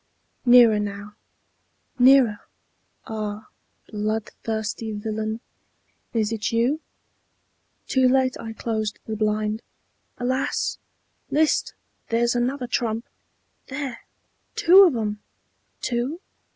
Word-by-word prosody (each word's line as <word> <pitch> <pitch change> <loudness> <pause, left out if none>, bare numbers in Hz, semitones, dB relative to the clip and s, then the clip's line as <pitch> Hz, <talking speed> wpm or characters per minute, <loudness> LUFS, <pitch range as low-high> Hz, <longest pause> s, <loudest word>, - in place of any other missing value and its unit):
Nearer 240 -3 +7
now, 205 0 -5 0.9
nearer 250 -4 +6 0.7
Ah! 215 -1 -5 0.4
bloodthirsty 220 +1 -3
villain, 220 +1 -3 0.7
Is 220 -3 0
't 220 -2 -2
you? 240 +7 +1 1.1
Too 260 -1 +3
late 260 0 +3
I 225 -1 -6
closed 220 -2 -2
the 220 - -4
blind! 215 0 0 0.6
Alas! 255 +2 -1 0.5
List! 310 +1 +1 0.3
there's 235 +1 +2
another 250 +2 -1
trump! 230 -1 -1 0.6
There, 265 -3 -5 0.5
two 380 +4 +8
of 330 -8 +2
'em! 210 -2 -2 0.6
Two? 250 +7 -2
225 Hz, 90 wpm, -24 LUFS, 215-255 Hz, 1.1 s, two